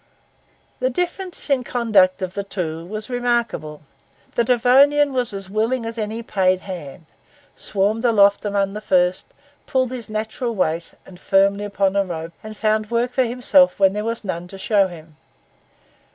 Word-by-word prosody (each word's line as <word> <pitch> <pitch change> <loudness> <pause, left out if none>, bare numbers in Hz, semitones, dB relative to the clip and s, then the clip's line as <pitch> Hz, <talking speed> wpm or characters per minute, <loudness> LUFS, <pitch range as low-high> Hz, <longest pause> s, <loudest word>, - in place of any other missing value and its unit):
The 255 - +1
difference 360 +5 -4
in 275 -3 +2
the - - -8
conduct 205 -6 +3
of 185 -1 -4
the 200 - -3
two 170 -4 -5
was 215 +2 -6
remarkable. 235 - -2 0.5
The 235 - +2
Devonian 270 +4 +4
was 250 -2 0
as 195 -1 -6
willing 225 +5 -1
as 230 0 -5
any 220 +2 -3
paid 185 -4 +1
hand, 170 -4 -8 0.5
swarmed 210 +3 -1
aloft 205 -4 +4
among 200 -1 0
the 210 - -6
first, 180 -2 +1 0.4
pulled 260 -2 0
his 245 -4 -6
natural 220 +3 -3
weight 165 -3 -1
and 180 -2 -14
firmly 200 +1 +2
upon 200 -1 0
a 200 - +3
rope, 165 -2 -6
and 215 0 -9
found 215 0 0
work 235 +1 0
for 260 0 +2
himself 255 +3 +3
when 195 -1 +4
there 210 +1 -3
was 230 +1 -3
none 175 -3 -4
to 195 - -10
show 200 0 +2
him. 160 -3 -13
210 Hz, 165 wpm, -21 LUFS, 190-240 Hz, 0.5 s, Devonian